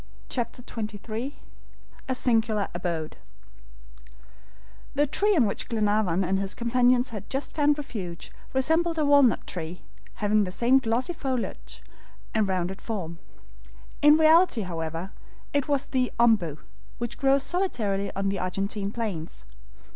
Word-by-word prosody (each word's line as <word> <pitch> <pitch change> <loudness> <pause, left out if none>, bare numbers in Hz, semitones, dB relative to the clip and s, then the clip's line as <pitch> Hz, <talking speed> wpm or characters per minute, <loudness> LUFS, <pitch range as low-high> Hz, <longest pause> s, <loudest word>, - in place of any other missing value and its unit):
CHAPTER 245 0 -2
XXIII 220 +4 -5 0.7
A 260 - +1
SINGULAR 225 -4 +1
ABODE 170 -3 -3 1.8
THE 290 - +3
tree 405 +8 +2
on 265 -8 +4
which 200 - -2
Glenarvan 210 -5 +1
and 190 +2 +1
his 195 -1 -2
companions 245 +1 +2
had 210 -2 -7
just 270 +2 -2
found 295 -1 +3
refuge, 195 - -6 0.2
resembled 325 +5 +1
a 305 - +2
walnut 285 -4 +4
tree, 170 0 -5 0.3
having 210 0 +2
the 185 - -3
same 240 +7 +4
glossy 245 +6 0
foliage 260 -6 -4 0.5
and 220 -2 +2
rounded 185 0 -2
form. 170 -7 -5 0.8
In 295 +1 +7
reality, 320 -5 +5
however, 165 +1 -4 0.4
it 285 -2 +1
was 285 -2 +1
the 255 -2 0
OMBU, 210 -11 +3 0.4
which 240 0 -5
grows 275 0 +3
solitarily 220 - -1
on 195 0 0
the 195 -1 -2
Argentine 195 +2 -2
plains. 175 - -5
225 Hz, 130 wpm, -26 LUFS, 195-270 Hz, 1.8 s, In